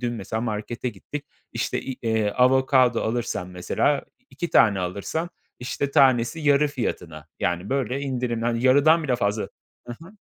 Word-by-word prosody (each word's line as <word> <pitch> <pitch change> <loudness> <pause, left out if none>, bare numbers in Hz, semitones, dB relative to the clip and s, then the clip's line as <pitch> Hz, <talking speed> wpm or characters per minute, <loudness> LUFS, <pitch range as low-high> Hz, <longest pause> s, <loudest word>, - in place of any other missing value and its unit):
dün 120 -1 -2
mesela 110 0 -4
markete 115 +2 -3
gittik, 145 +4 -8 0.3
işte, - - -2
i 130 - -6
eee, 110 -2 +1
avokado 130 0 +3
alırsan 110 -5 -2
mesela 90 +10 0 0.2
i - - -38
iki 175 - -5
tane 100 -4 +5
alırsan, 100 - -3 0.3
işte, 135 +3 -3
tanesi 130 +3 +3
yarı 145 0 +3
fiyatına. 85 - -5
Yani 90 +4 -1
böyle 135 -1 -1
indirimli 120 -2 -1
Yarıdan 155 +5 +5
bile 130 -4 0
fazla. 105 -1 0 0.4
Hı 120 - -6
hı. 185 - -13
120 Hz, 150 wpm, -24 LUFS, 110-140 Hz, 0.4 s, tane